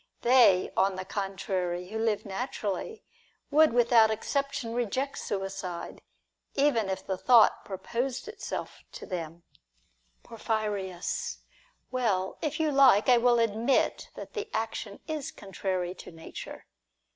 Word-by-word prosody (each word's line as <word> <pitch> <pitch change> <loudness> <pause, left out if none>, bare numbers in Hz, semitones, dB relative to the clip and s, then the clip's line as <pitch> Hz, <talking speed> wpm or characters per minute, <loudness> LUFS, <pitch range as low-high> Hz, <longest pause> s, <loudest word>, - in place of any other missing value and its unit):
They, 235 -7 +5
on 195 0 +2
the 185 0 -5
contrary, 185 -2 -3
who 220 +1 -4
live 220 -2 0
naturally, 210 - -4 0.5
would 310 +1 +6
without 235 -2 +5
exception 245 +2 -2
reject 250 +4 -2
suicide, 195 -3 -5 0.5
if 280 - +3
even 230 -8 +2
the 190 0 -3
thought 240 -4 +5
proposed 240 - -3
itself 435 - -6
to - - -8
them. 170 -2 -6 0.8
Porphyrius. 215 - -3 0.5
Well, 210 -7 0
if 305 -1 -2
you 310 -1 +2
like, 265 -6 +6
I 245 -1 +7
will 240 0 +4
admit 230 +3 +1
that - - -9
the 440 -1 -4
action 220 -2 -4
is 310 -4 -3
contrary 185 -2 -3
to 185 - -11
nature. 165 -1 -9
220 Hz, 120 wpm, -29 LUFS, 190-255 Hz, 0.8 s, I